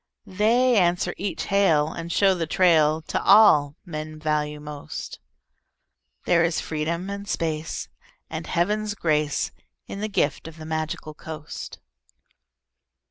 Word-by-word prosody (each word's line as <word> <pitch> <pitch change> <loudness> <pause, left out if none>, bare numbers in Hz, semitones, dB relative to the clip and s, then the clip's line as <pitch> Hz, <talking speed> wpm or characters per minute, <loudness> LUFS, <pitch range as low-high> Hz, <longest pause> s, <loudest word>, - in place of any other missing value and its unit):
They 230 +5 +3
answer 175 -2 +2
each 195 -4 -3
hail 165 -7 +3
and 170 0 -6
show 195 +1 +4
the 170 -3 -2
trail 160 -3 +3
To - - -2
all 155 -9 +6
men 155 -2 -6
value 150 -1 -1
most. 150 -1 -7 1.1
There 170 -1 +4
is 165 0 +1
freedom 165 +4 -3
and 200 0 -6
space 160 -2 -2 0.4
and - - -6
Heaven's 210 +4 0
grace 150 -5 0 0.3
In 200 - -7
the 215 - -2
gift 195 - 0
of 165 0 -11
the 155 - -9
Magical 155 -1 -4
Coast. 155 -1 -8
165 Hz, 130 wpm, -24 LUFS, 155-195 Hz, 1.1 s, all